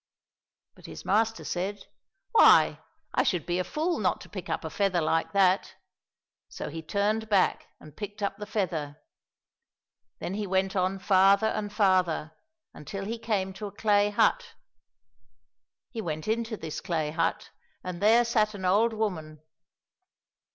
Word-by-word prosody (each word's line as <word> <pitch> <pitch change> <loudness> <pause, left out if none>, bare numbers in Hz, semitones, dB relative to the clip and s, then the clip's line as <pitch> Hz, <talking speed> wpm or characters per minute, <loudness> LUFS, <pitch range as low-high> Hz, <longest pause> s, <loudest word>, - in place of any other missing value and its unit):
— - - -66
But - - -14
his - - -10
master 220 +3 +1
said, 195 +3 -4 0.2
" 390 0 -53
Why, 460 - +6 0.3
I - - +3
should 180 -4 0
be 175 +1 -1
a - - +1
fool 320 - -2
not - - 0
to - - -12
pick - - -7
up - - -2
a - - -5
feather 195 -3 +1
like 165 0 0
that! 195 -1 +2 0.4
" - - -66 0.3
So - - -6
he 160 +2 -6
turned 210 +6 -1
back 200 -3 +2
and 155 -1 -15
picked 205 0 -7
up 200 0 -2
the 210 0 -7
feather. 160 -8 -3 1.2
Then 180 - -5
he 205 0 -3
went 190 +1 0
on 185 +1 0
farther 195 +2 +4
and 205 -2 -3
farther, 185 -7 +1 0.4
until 195 +7 -7
he 230 +3 -4
came 200 -4 -1
to 205 +2 -6
a - - -9
clay 205 0 +2
hut. 205 - +1 1.4
He 230 - -4
went 155 -3 -4
into 225 0 -1
this 160 -4 -6
clay 155 -3 -2
hut, 165 +1 -1 0.3
and 180 -1 -6
there 230 +3 +5
sat 215 -2 +1
an 190 -2 -6
old 215 +5 +3
woman. 160 -8 -4
195 Hz, 165 wpm, -27 LUFS, 175-215 Hz, 1.4 s, Why